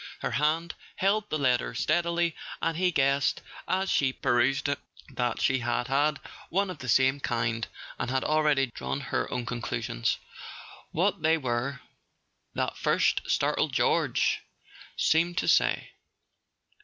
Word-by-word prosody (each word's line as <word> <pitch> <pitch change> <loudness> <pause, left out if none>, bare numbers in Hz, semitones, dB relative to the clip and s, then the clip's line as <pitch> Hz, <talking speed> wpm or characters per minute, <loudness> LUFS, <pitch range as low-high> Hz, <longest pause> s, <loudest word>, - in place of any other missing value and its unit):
Her - - -2
hand 160 +4 +1 0.2
held 205 +2 +1
the 155 - 0
letter 125 -4 +1
steadily, 170 +7 +1 0.2
and 165 - 0
he 180 +2 +2
guessed, 140 -3 +1 0.2
as 190 +1 0
she 135 -2 +3
perused 130 +2 +1
it, 140 -1 -1 0.3
that 125 -3 -2
she 130 0 +2
had 120 +1 -1
had 145 +2 +2 0.3
one 195 +1 0
of - - -9
the 125 - -7
same 130 +3 +4
kind, 115 -2 -1 0.3
and 120 - -2
had 130 +1 0
already 150 -4 +2
drawn - - -3
her 135 - -2
own 125 -1 -2
conclusions. 120 - -2 0.7
What 195 +2 +1
they 160 +1 +3
were, 125 -1 -2 0.7
that - - -1
first - - +2
startled - - +1
"George!" - - +2 0.6
seemed 170 +2 +2
to - - 0
say. - - +2
140 Hz, 140 wpm, -28 LUFS, 125-165 Hz, 0.7 s, same